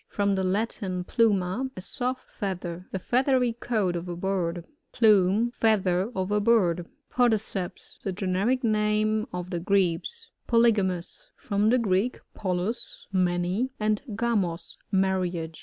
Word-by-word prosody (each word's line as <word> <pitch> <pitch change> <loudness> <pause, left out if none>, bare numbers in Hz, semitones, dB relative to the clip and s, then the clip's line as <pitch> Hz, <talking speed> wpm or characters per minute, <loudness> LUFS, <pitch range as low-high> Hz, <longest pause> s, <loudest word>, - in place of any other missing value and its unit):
— - - -53
From 200 -1 +2
the 190 -1 0
Latin, 190 -1 -1
pluma, 210 +3 +1
a - - -5
soft 255 +6 -3
feather. 180 -3 -4
The - - -2
feathery 250 +3 +2
coat 215 -6 -1
of 170 +1 -4
a 175 - -3
bird. 175 -2 -2 0.3
Plumb. 215 0 +4
— - - -42
Feather 195 -2 +2
of 190 +1 -2
a 210 - +3
bird. 180 -6 +2 0.2
PoDicBps. 220 -6 -1
— - - -26
The 195 - -2
Generic 200 +7 0
name 215 0 +1
of 180 0 -5
the 175 - -1
Grebes. 200 - 0 0.2
PoLYOAMoas 220 - +1
— - - -53
From 205 0 +2
the 250 - +4
Greek, 215 +1 +1 0.2
poilus^ 190 +4 -3
many, 180 +5 +1
and 215 -1 +1
gamos^ 200 -7 -1 0.2
marriage. 180 -4 0
200 Hz, 145 wpm, -27 LUFS, 180-230 Hz, 0.3 s, Plumb